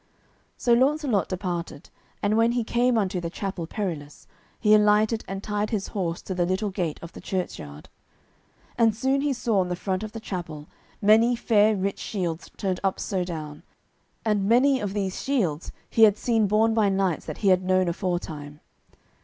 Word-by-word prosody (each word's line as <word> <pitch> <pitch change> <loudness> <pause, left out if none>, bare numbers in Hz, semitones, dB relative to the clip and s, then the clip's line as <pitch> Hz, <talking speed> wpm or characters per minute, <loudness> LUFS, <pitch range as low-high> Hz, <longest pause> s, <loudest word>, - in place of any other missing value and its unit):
So 240 - +2
Launcelot 260 - +2
departed, 175 -5 -4 0.3
and 205 +1 +2
when 230 +1 +3
he 240 -1 0
came 240 +1 +2
unto 190 -4 0
the 170 - -3
Chapel 185 -2 -4
Perilous, 160 -8 -5 0.3
he 210 -1 +4
alighted 215 +1 +4
and 195 +1 -5
tied 210 0 -1
his 210 -3 -2
horse 175 -4 -3
to 190 - -4
the 180 -1 0
little 195 +3 -1
gate 175 -5 -2
of 170 - -8
the - - -10
churchyard. 75 - -5 0.9
And 225 -2 +4
soon 265 +4 +1
he 290 0 +1
saw 235 -5 0
on 180 -1 0
the 180 - -1
front 185 +1 -2
of 215 -1 -6
the 225 - -5
chapel 170 -8 -6 0.4
many 225 +4 +5
fair 215 -2 +3
rich 195 0 -2
shields 175 -5 -4
turned 190 -2 -1
up 195 -1 0
so 190 -3 -1
down, 155 -4 -6 0.6
and 205 -2 +1
many 260 +3 +4
of 205 -1 -4
these 195 -2 -2
shields 185 - -1 0.2
he 225 - 0
had 215 -2 +7
seen 225 -3 +1
borne 220 +2 +3
by 215 -3 +3
knights 190 -4 0
that - - -5
he - - +6
had 185 -1 +4
known 185 0 +2
aforetime. 165 -5 -4
200 Hz, 180 wpm, -25 LUFS, 180-220 Hz, 0.9 s, had